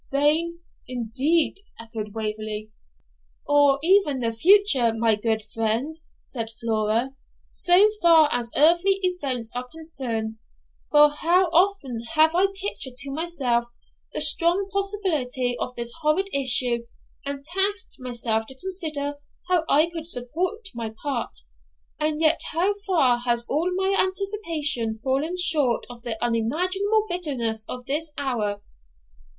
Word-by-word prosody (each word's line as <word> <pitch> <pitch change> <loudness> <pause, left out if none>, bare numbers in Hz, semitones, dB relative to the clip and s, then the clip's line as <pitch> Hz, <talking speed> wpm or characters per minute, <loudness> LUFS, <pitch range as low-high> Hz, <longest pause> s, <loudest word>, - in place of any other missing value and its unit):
'Vain 310 +5 +1 0.3
indeed!' 260 - 0 0.2
echoed 225 -2 -7
Waverley. 215 0 -4 0.7
'Or 285 -1 +4
even 325 -8 +3
of 230 0 0
the 225 - -18
future, 360 - +5
my 225 -1 +2
good 220 0 -1
friend,' 225 +8 -2 0.2
said 230 -4 -5
Flora,'so 235 - +1
far 330 -3 +6
as 235 -1 -1
earthly 345 +6 +5
events 275 -11 -2
are 250 0 -5
concerned; 240 -9 -3 0.5
for 295 0 +6
how 345 +5 +2
often 340 - +1
have 315 +1 +5
I 370 +3 +4
pictured 390 -9 -5
to 275 +2 -2
myself 275 -7 -1 0.5
the - - -3
strong 355 +3 +2
possibility 315 -12 -1
of 250 - -4
this 235 0 -3
horrid 320 +6 +1
issue, 250 -3 +2 0.4
and 280 0 -6
tasked 385 +3 -2
myself 235 -3 -2
to 265 - -11
consider 305 -4 -4 0.3
how 350 -3 +2
I 305 +3 +4
could 325 -1 -5
support 345 - -1
my 225 -2 -5
part; 255 - -3 0.6
and 305 0 0
yet 320 0 +4
how 360 +5 +1
far 270 -10 +3
has 240 -1 +1
all 320 +6 0
my 385 +1 +1
anticipation 335 - 0
fallen 270 +8 -1
short 295 -9 +3
of 240 -1 -12
the 230 -2 -3
unimaginable 365 - 0
bitterness 250 - -2
of 250 -1 -6
this 300 +4 -2
hour!' 210 -7 -2
280 Hz, 130 wpm, -24 LUFS, 235-345 Hz, 0.7 s, far